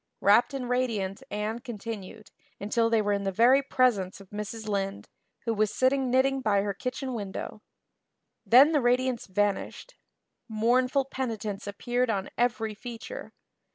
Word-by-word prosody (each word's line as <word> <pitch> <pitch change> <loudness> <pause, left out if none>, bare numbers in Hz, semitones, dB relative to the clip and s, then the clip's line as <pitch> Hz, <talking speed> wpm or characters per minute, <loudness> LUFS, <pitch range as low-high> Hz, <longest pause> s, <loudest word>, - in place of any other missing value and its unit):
Rapt 230 +7 +4
and 255 -2 -4
radiant 230 -5 -1
Anne 210 +2 -3
continued 220 -3 -8 0.3
until 230 +3 +1
they 225 -2 +2
were 205 0 +1
in 200 - 0
the 195 -1 -1
very 240 +7 +5
presence 245 -9 +1
of 195 -2 -15
Mrs. 210 +1 -6
Lynde, 195 -1 -2 0.4
who 230 - +1
was 215 -1 +1
sitting 260 +3 +2
knitting 265 +2 +2
by 200 -4 +2
her 200 -1 -2
kitchen 255 +5 -4
window. 205 -1 -6 0.8
Then 265 +6 +7
the 295 -3 +2
radiance 250 0 +1
vanished. 205 - -2 0.6
Mournful 250 +5 +2
penitence 220 -7 -4
appeared 240 +4 -1
on 195 -3 -2
every 235 -2 0
feature. 230 +1 -8
230 Hz, 145 wpm, -28 LUFS, 205-255 Hz, 0.8 s, Then